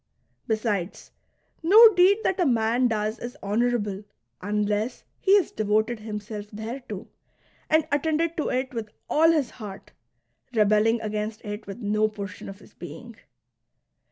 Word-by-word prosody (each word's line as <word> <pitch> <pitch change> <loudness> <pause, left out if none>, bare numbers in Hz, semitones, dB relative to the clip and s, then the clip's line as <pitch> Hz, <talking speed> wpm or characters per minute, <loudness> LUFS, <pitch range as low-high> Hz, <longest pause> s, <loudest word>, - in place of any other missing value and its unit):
Besides, 215 -4 -2 0.5
no 435 +7 +8
deed 380 +4 +5
that 380 - 0
a 355 - +3
man 235 +1 +2
does 215 0 -2
is 240 +1 -7
honourable 210 -1 0 0.4
un 210 +2 0
less 210 +4 -2 0.2
he 390 +1 +5
has 385 - 0
devoted 215 +2 0
himself 210 -1 -6
thereto 225 +5 -7 0.6
and 315 -1 +3
attended 320 +3 0
to 310 - -1
it 260 +1 -2
with 225 -3 -4 0.2
all 320 +2 +5
his 300 -7 +1
heart, 210 -4 -10 0.6
rebelling 215 +2 +3
against 215 +1 -4
it 210 0 -6
with 200 +5 -8
no 215 +1 +2
portion 205 -2 -7
of 195 - -9
his 205 - -19
being. 230 +6 -10
220 Hz, 140 wpm, -25 LUFS, 210-260 Hz, 0.6 s, no